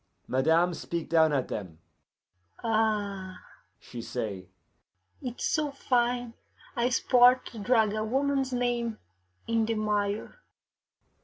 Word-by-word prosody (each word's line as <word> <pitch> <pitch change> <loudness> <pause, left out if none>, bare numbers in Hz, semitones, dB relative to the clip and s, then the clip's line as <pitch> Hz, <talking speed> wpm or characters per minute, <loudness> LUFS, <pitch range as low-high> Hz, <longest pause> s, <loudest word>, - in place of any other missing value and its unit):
Madame 160 +7 +3
speak 170 0 -5
down 160 -2 +5
at 135 -3 0
them. 90 -7 -6 0.9
'Ah,' 205 -4 -1 0.4
she 120 - -9
say, 105 -6 -5 0.7
'it 250 -3 -6
is - - -2
so 305 -1 +1
fine 245 -3 0 0.4
a 240 0 +1
sport 250 0 +5
to 230 - -9
drag 220 -1 +2
a 215 0 -1
woman's 270 +3 0
name 240 -2 -1 0.5
in 230 -1 +1
the 225 +1 -1
mire! 210 - -1
220 Hz, 115 wpm, -28 LUFS, 175-245 Hz, 0.9 s, down